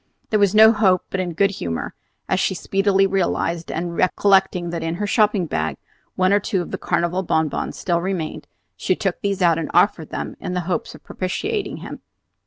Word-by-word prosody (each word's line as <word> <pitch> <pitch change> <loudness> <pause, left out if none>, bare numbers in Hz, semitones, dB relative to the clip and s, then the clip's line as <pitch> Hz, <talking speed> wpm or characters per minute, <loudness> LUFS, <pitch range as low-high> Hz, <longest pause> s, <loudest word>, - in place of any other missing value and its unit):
There 215 - +3
was 200 0 +3
no 220 +1 +8
hope 190 -4 +3
but 195 - -2
in 180 -2 -2
good 195 +3 +3
humor, 85 - -4 0.3
as 190 - +1
she 190 - 0
speedily 195 +1 +2
realized; 175 -3 -1
and 170 +1 -3
recollecting 185 -2 +2
that 170 -1 -3
in 165 +1 -2
her 205 - -2
shopping 210 -3 +2
bag 80 - -2 0.4
one 185 +1 +3
or 205 - +5
two 190 -2 -1
of - - -10
the - - -4
Carnival 175 +2 0
bonbons 160 -4 -1
still 170 -2 0
remained, 180 -4 -4 0.3
she 185 - 0
took 195 -3 -2
these 200 -2 -1
out 165 -2 +4
and 160 - -4
offered - - +3
them - - -5
in 180 - -4
the 180 - 0
hope 175 -2 -2
of - - -16
propitiating 405 - -3
him. - - -8
185 Hz, 195 wpm, -21 LUFS, 170-200 Hz, 0.4 s, no